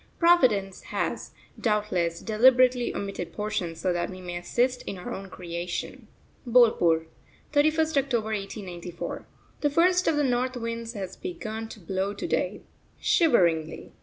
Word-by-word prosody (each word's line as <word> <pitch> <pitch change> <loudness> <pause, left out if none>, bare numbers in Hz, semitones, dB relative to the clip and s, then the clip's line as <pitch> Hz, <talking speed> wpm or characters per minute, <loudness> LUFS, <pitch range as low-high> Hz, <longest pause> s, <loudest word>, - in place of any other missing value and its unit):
Providence 250 - +3
has, - - -3 0.3
doubtless, 205 -6 0
deliberately 250 +2 +4
omitted 195 -3 -4
portions 190 -6 -3
so 180 0 +1
that 175 0 -1
we 185 - -8
may 180 -1 -6
assist 245 +8 0
in 195 - -4
our 180 - -6
own 195 0 -7
creation. 175 0 -5 0.4
BOLPUR, 220 -9 +4 0.5
31st 310 +1 +3
October 225 -5 -1
1894. 185 -4 -6 0.3
The 290 - +2
first 360 +5 +3
of 320 - +3
the 295 - +2
north 255 0 0
winds 230 0 -4
has 190 -4 -6
begun 225 -12 -6
to 220 - -10
blow 190 +3 -2
to 200 - -5
day, - - -1 0.4
shiveringly. 170 - +2
215 Hz, 135 wpm, -27 LUFS, 180-255 Hz, 0.5 s, deliberately